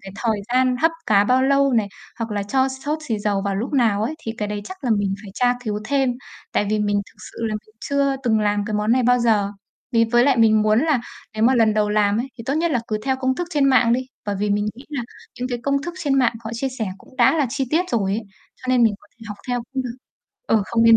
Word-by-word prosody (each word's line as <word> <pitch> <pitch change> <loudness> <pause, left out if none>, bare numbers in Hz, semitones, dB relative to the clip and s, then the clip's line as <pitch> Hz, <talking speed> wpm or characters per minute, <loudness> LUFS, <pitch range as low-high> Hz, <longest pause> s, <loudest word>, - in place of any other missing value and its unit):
cái 195 0 -10
thời 225 -2 0 0.2
gian 255 0 +3
hấp 325 - +5 0.2
cá 200 -1 +4
bao 255 +4 +3
lâu 275 0 +3
này, 215 -4 +2 0.3
hoặc 230 -1 -3
là 205 -1 -1
cho 260 +6 +1
sốt 285 +4 -3
xì 220 -3 0
dầu 205 -1 0
vào 200 -1 -1
lúc 235 +8 -3
nào 220 -6 +2
ấy, 265 +8 -1
thì 225 - -4
cái 210 - -2
đấy 210 0 -3
chắc 375 - -10
là 245 - 0
mình 200 -1 0
phải 200 - -10
tra 245 +2 +2
cứu 210 -2 -2
thêm. 270 +1 +1 0.4
Tại 205 - +1
vì 215 - +1
mình 205 -1 +1
thực - - -21 0.2
sự - - -13
là 215 - -2
mình 215 +1 -9
chưa 280 -1 +1
từng 225 -3 +2
làm 205 -1 +1
cái 215 - -3
món 210 +2 +1
này 255 0 +3
bao 245 +1 +4
giờ, 215 -4 +2 0.4
vì 230 -1 +4
với 240 0 +5
lại 275 -2 +3
mình 220 -1 +5
muốn 215 +1 +3
là 300 -4 +2 0.3
nếu 215 - -2
mà 250 +4 +5
lần 225 -3 +3
đầu 210 -1 +2
làm 210 0 +2
ấy, 260 - -4
thì 230 - -7
tốt 275 - 0
nhất 335 +2 +1
là 250 -5 +1
cứ 215 - -1
theo 265 -1 +1
công 260 0 0
thức 350 +4 -4
trên 295 -5 +2
mạng 250 -4 +4
đi. 245 - +2 0.3
Bởi 205 -1 -1
vì 205 +1 0
mình 205 +1 +1
nghĩ 255 +4 -13
là 285 -5 -3 0.4
những 250 +1 -2
cái 245 -1 -2
công 280 0 0
thức 345 +3 -5
trên 280 -3 +1
mạng 250 -3 +3
họ 220 - -4
chia 265 +4 -1
sẻ 220 - -1
cũng 260 - -19
đã 245 +5 +4
là 295 -4 +2
chi 270 +1 -1
tiết 335 +4 +2
rồi 200 -5 +1
ấy, 220 +3 -1 0.3
cho - - -19
nên 255 -1 +4
mình 225 -3 +4
có - - -21
thể 225 - -12
học 205 - -6
theo 245 -1 -1
cũng 265 -1 -1
được. 245 -1 -6 0.5
Ừ, 220 - +3
không 230 -1 +1
nên 230 0 +8
235 Hz, 285 wpm, -22 LUFS, 210-265 Hz, 0.5 s, nên